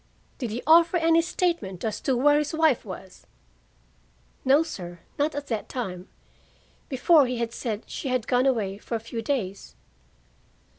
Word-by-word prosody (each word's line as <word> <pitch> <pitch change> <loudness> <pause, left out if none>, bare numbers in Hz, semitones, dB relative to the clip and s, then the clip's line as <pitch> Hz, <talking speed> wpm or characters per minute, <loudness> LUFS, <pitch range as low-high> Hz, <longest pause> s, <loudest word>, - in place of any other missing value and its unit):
"Did 245 -5 -3
he 230 +4 -4
offer 335 +3 +6
any 330 0 +4
statement 330 - -2
as 215 -2 -3
to 260 -2 +1
where 290 +3 +4
his 300 +1 -2
wife 315 -6 +3
was?" 190 -2 -10 1.2
"No, 275 +4 +5
sir. 175 - -8 0.2
Not 295 +1 +1
at 290 0 -4
that 220 -3 -3
time. 185 -7 -5 0.8
Before, 280 +1 +4
he 250 0 -2
had 230 -1 -2
said 225 -3 -4
she - - -6
had 255 -3 0
gone 250 +2 +2
away 205 -6 0
for 230 - -5
a - - -1
few 230 +1 -6
days." 220 -6 -3
250 Hz, 160 wpm, -26 LUFS, 215-295 Hz, 1.2 s, offer